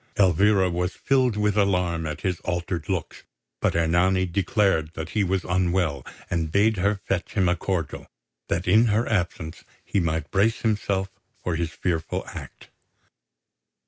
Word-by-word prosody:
Elvira 95 +1 +4
was 90 +1 -2
filled 130 -5 +2
with 105 -1 +1
alarm 90 -5 +1
at 75 0 -5
his 90 0 -1
altered 85 -1 -3
looks; 95 -4 -3 0.4
but - - +1
Ernani 90 +3 +3
declared 90 -3 +1
that 80 0 -5
he 105 - +1
was 95 -1 0
unwell, 90 -3 0 0.2
and 80 -2 -1
bade 105 +4 +3
her 100 +3 +2
fetch 95 -2 -2
him 95 -4 +2
a 90 - +3
cordial, 85 -5 -3 0.4
that 90 +3 -1
in 115 +2 +5
her 110 +2 +1
absence 85 -6 -2 0.2
he 100 - 0
might 80 -2 -1
brace 105 +4 +2
himself 100 -3 0 0.3
for 90 - -1
his 85 0 -1
fearful 80 -1 -2
act. - - -10
90 Hz, 150 wpm, -25 LUFS, 85-100 Hz, 0.4 s, in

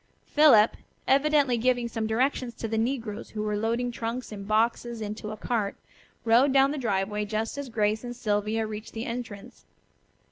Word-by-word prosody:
Philip, 270 -8 +5 0.3
evidently 280 -3 +3
giving 245 0 +1
some 225 -1 -3
directions 245 +1 0
to 225 - -4
the 225 0 -1
negroes 230 -3 -3
who 215 -1 -4
were 210 0 -1
loading 230 +3 -1
trunks 235 +1 -4
and 200 -2 -7
boxes 230 +2 +1
into 210 0 -5
a 215 - -6
cart, 215 -3 -1 0.5
rode 240 +5 +5
down 270 +1 +4
the 300 - -3
driveway 210 -2 -1
just 215 +2 -2
as 285 -2 -5
Grace 215 0 0
and 245 0 -6
Sylvia 215 -1 0
reached 215 0 -7
the 225 +1 -4
entrance. 230 -4 -7
225 Hz, 170 wpm, -27 LUFS, 215-245 Hz, 0.5 s, Philip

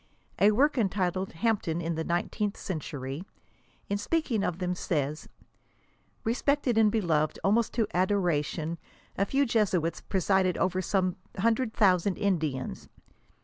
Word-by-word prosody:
A 200 - +6
work 265 +6 +3
entitled, 190 -2 0
" 230 - -4
Hampden 195 -7 +1
ia 170 -1 -2
the 160 0 -2
Nineteenth 195 +5 -1
Century," 145 -4 -5 0.7
in 200 0 -1
speaking 235 -4 0
of 170 - -1
them, 180 -1 -1
says, 150 -4 -2 0.5
" - - -39
respected 255 +2 +1
and 220 -1 +5
beloved 165 -8 +1
almost 220 +3 +2
to 230 -2 +2
adoration, 170 -4 0 0.4
a 200 - 0
few 275 +4 +2
Jesuits 190 - +1
presided 190 -1 +1
over 185 0 +1
some 185 -1 0 0.2
hundred 225 +3 +1
thousand 190 -3 +3
Indians. 160 -10 -2
190 Hz, 135 wpm, -28 LUFS, 170-215 Hz, 0.7 s, A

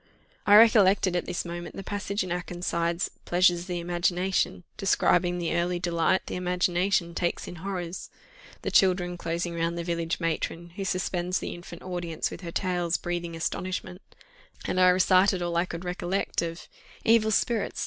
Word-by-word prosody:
I 205 - +8
recollected 200 -4 +5
at 175 - -1
this 175 - -3
moment 175 0 -6
the 195 - -6
passage 200 0 -2
in 185 - -6
Akenside's 175 -1 -2
"Pleasures 175 0 +4
of 175 - -8
the 175 -1 -2
Imagination" 175 +2 0
describing 180 -2 +2
the 170 -1 -1
early 175 +1 0
delight 175 +1 +1
the - - -6
imagination 180 0 +1
takes 175 0 -2
in 175 - -8
horrors: 180 -1 -5 0.5
the - - -2
children 180 -2 +3
closing 170 0 -3
round 170 0 -1
the 170 - -2
village 170 -1 -2
matron, 165 0 -2
who 195 +3 -5
suspends 180 -1 -1
the - - -4
infant 175 0 -10
audience 175 -3 -3
with - - -8
her 170 -2 -6
tales 175 -2 0
breathing 175 -1 -4
astonishment; 185 +2 -4 0.6
and 185 - 0
I 185 0 +7
recited 185 0 +4
all 170 -1 -2
I 170 +2 +1
recollected 180 0 -2
of 165 +1 -10 0.4
"Evil 225 -1 +5
spirits! 220 0 0
175 Hz, 160 wpm, -27 LUFS, 170-185 Hz, 0.6 s, I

